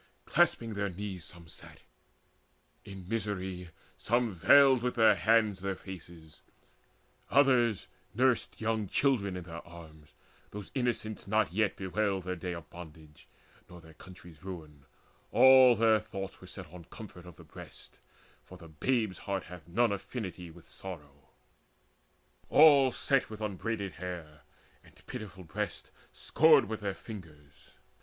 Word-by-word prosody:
Clasping 120 -10 +2
their 100 -1 -2
knees 95 -1 -6
some 85 -2 -10
sat; - - -12 1.0
in 95 -2 -10
misery 95 -4 -3 0.3
some 120 -1 +1
Veiled 135 +7 +6
with 125 0 -1
their 110 -2 +6
hands 110 -1 +2
their 95 0 -3
faces; 85 -4 -11 0.9
others 125 -7 +3 0.3
nursed 130 0 +1
Young 110 -2 -1
children 100 -7 +1
in 90 - -6
their 85 -1 -9
arms: 80 -3 -14 0.3
those 105 -1 -8
innocents 120 -5 -2
Not 110 -3 +1
yet 105 -1 +1
bewailed 95 0 -1
their 90 +1 -3
day 90 +1 -5
of 85 -2 -10
bondage, 80 -3 -13 0.4
nor 90 - -12
Their 80 -1 -16
country's 85 0 -14
ruin; 80 -7 -9 0.5
all 130 -2 +8
their 110 -1 +4
thoughts 95 0 -7
were - - -12
set - - -8
On 90 -1 -10
comfort 90 -4 -11
of 90 - -12
the - - -14
breast, - - -12 0.4
for 90 - -13
the 85 -2 -13
babe's 110 - -1
heart 100 -2 -3
Hath 85 -2 -12
none 115 +6 +2
affinity 95 -4 -5
with 85 0 -16
sorrow. 75 -6 -10 1.2
All 145 -4 +7
Sat 135 +2 0
with 110 -1 -8
unbraided 105 -1 -3
hair 85 -5 -8 0.4
and - - -21
pitiful 105 -6 -8
breasts 80 - -5 0.2
Scored - - +4
with 110 +1 -5
their 100 -2 -3
fingers. 75 -11 -13
95 Hz, 140 wpm, -31 LUFS, 85-110 Hz, 1.2 s, all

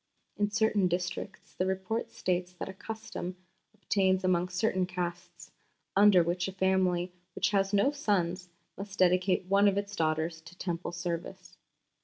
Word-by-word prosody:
In 205 0 +1
certain 210 -2 +2
districts 180 +3 -4
the 185 - -1
Report 190 +4 -2
states 180 0 -2
that 180 - -6
a 190 - -6
custom 190 -3 -6 0.4
obtains 190 -2 +1
among 180 -1 +2
certain 185 0 0
castes, 175 -1 -5 0.4
under 200 -3 +7
which 175 +2 -1
a 190 - -5
family 185 -2 +1 0.2
which - - +1
has 195 -1 +2
no 205 +7 +3
sons 185 - -1 0.3
must 200 0 -8
dedicate 185 0 +3
one 200 +2 +4
of 200 -1 +2
its 200 0 -3
daughters 160 +1 0
to 170 +2 -14
Temple 175 -2 -3
service. 175 +2 -5
185 Hz, 150 wpm, -30 LUFS, 175-195 Hz, 0.4 s, under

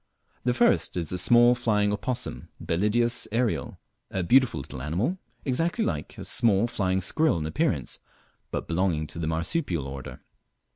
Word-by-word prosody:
The 125 -1 +2
first - - +2
is 85 -3 -2
the 90 - -1
small 120 +4 +6
flying 105 -4 +1
opossum, 120 +4 -3
Belideus 115 +7 0
ariel, 110 - -1 0.3
a 95 - -2
beautiful 130 - +3
little 65 -1 -8
animal, 95 - -1 0.3
exactly 165 - 0
line 75 -2 -2
a - - -7
small 110 -2 +2
flying 95 -5 0
squirrel 155 - +2
in 75 - -3
appearance, 80 - -1 0.5
but - - -4
belonging 85 -3 0
to 80 - -7
the 80 - -2
marsupial 85 - -1
order. 65 -2 -7
95 Hz, 150 wpm, -26 LUFS, 80-120 Hz, 0.5 s, small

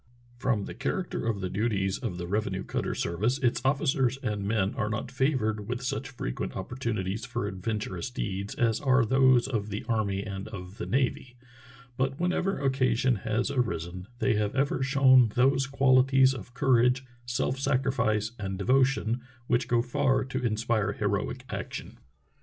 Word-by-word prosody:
From 120 -6 0
the - - -7
character 140 0 -3
of 105 -4 -1
the 95 - -2
duties 100 -3 0
of 90 - -4
the 90 - -4
revenue 100 0 -1
cutter - - -2
service 110 +10 0
its 130 -4 +1
officers 135 -2 +2
and 105 -4 -2
men 105 -2 +1
are 110 -5 -1
not 110 0 -3
favored 125 -6 0
with 125 +1 -3
such 135 +2 -3
frequent - - -4
opportunities 110 -1 -3
for 120 -5 -3
adventurous 100 0 -3
deeds 100 -5 -4
as 115 -2 +1
are 130 -2 +4
those 130 0 +4
of 110 -5 -2
the 105 +1 -4
army 100 -4 0
and 100 -1 -6
of 100 0 -9
the - - -4
navy, 130 -1 -1 0.6
but 135 +1 -1
whenever 180 +2 0
occasion 130 -3 +2
has 110 +6 -1
arisen 90 - -2
they 125 0 +2
have 105 +1 -1
ever 135 -1 +1
shown 130 -3 +5
those 135 +1 +3
quali 135 -2 +4
ties 135 0 +4
of 125 -2 -9
courage, 125 0 +3 0.2
self 125 +2 -1
sacrifice, 125 -6 +1
and 95 -2 -3
devotion 125 +1 +2 0.2
which 120 +1 +1
go 120 -1 +2
far 130 +1 +1
to 130 -1 -4
inspire 110 -2 0
heroic 105 +5 -2
action. - - -6
120 Hz, 160 wpm, -28 LUFS, 105-130 Hz, 0.6 s, shown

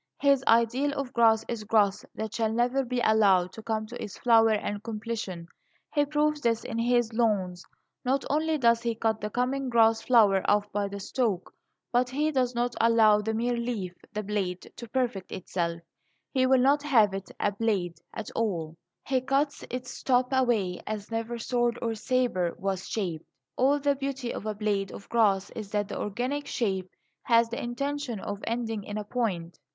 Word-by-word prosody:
His 280 -2 +3
ideal 240 +5 +3
of 275 -2 -4
grass 225 -2 +4
is 230 -3 -4
growth 210 -2 +2
that 220 0 -4
shall 225 -1 0
never 245 +4 +1
be 250 -1 -2
allowed 195 -5 +4
to 220 - -9
come 220 -1 -2
to 240 +3 -7
its 210 - -7
flower 225 -2 +5
and 205 -1 -2
completion. 215 -6 -5 0.5
He 290 -1 +3
proves 300 0 +1
this 230 -3 +1
in 230 -2 -4
his 240 -1 +2
lawns. 195 -6 0 0.4
Not 265 +2 0
only 310 +2 +1
does 235 -3 +3
he 235 -1 -1
cut 220 -1 0
the 210 - -2
coming 255 +4 -1
grass 225 -1 +4
flower 210 -6 +5
off 205 0 +3
by 205 -1 -1
the 200 0 -6
stalk, 200 -3 -2 0.4
but 250 +1 +2
he 300 +4 0
does 255 -3 0
not 240 0 0
allow 225 -2 +5
the 220 +1 -2
mere 240 +2 0
leaf 235 -7 -3 0.2
the 215 -1 -3
blade 195 -3 -3
to 235 - -8
perfect 240 -7 -2
itself. 170 -2 -3 0.5
He 260 -2 +3
will 260 -1 +5
not 280 +3 +4
have 230 -9 +4
it 195 0 -5
a 205 - +1
"blade" 195 -5 -1
at 220 -2 -6
all; 165 -8 -2 0.3
he 260 -2 +1
cuts 275 +3 0
its 250 0 -6
top 250 -1 +2
away 230 -9 +1
as 215 0 -5
never 230 +1 -3
sword 240 0 0
or 230 -1 -1
sabre 225 -7 0
was 190 -1 -3
shaped. 175 -7 -3 0.3
All 275 +3 +3
the 285 0 +2
beauty 270 -3 -3
of 215 - -6
a 215 - -2
blade 200 -2 -1
of 200 - -10
grass 200 -5 +2
is 215 -3 -7
that 205 -1 0
the - - -4
organic 250 +8 -2
shape 190 -5 -1 0.3
has 230 -1 +3
the 235 - -4
intention 275 -1 -3
of 200 +1 -5
ending 225 -2 -2
in 205 +1 -5
a 210 - -3
point. 200 -7 -3
230 Hz, 185 wpm, -28 LUFS, 205-250 Hz, 0.5 s, flower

